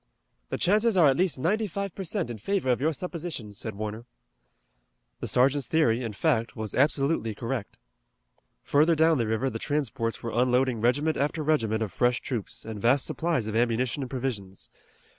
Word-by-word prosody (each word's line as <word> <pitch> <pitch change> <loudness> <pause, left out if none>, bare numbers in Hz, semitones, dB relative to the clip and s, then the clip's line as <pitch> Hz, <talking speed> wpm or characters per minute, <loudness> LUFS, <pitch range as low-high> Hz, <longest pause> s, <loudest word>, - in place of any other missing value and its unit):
"The - - -2
chances 210 +2 +3
are 160 -5 +7
at 135 - +3
least 180 0 +1
ninety 210 +10 0
five 200 0 -4
per 195 - -5
cent 180 - -2
in 110 - -7
favor 170 - 0
of 125 - 0
your 155 +3 +2
supposition," 160 - -5
said 110 +1 -5
Warner. 110 +2 -5 1.1
The - - -4
sergeant's 135 +1 +2
theory, 125 -7 +2
in 115 -4 -4
fact, 115 -2 0
was 110 -2 -5
absolutely 140 -4 +2
correct. 115 -1 -4 0.9
Further 155 +4 +3
down 160 -1 +4
the 115 - 0
river 110 +5 0
the 115 - -5
transports 120 -6 -2
were 115 - -3
unloading 125 -1 +2
regiment 145 +7 +2
after 150 +2 -1
regiment 115 -8 +1
of 100 -6 -6
fresh 120 0 +2
troops, 120 -7 -5
and 110 -2 -6
vast 125 +4 +3
supplies 165 -9 -1
of 110 0 -4
ammunition 120 +3 +1
and 130 - -4
provisions. 115 -8 -5
130 Hz, 180 wpm, -27 LUFS, 115-160 Hz, 1.1 s, are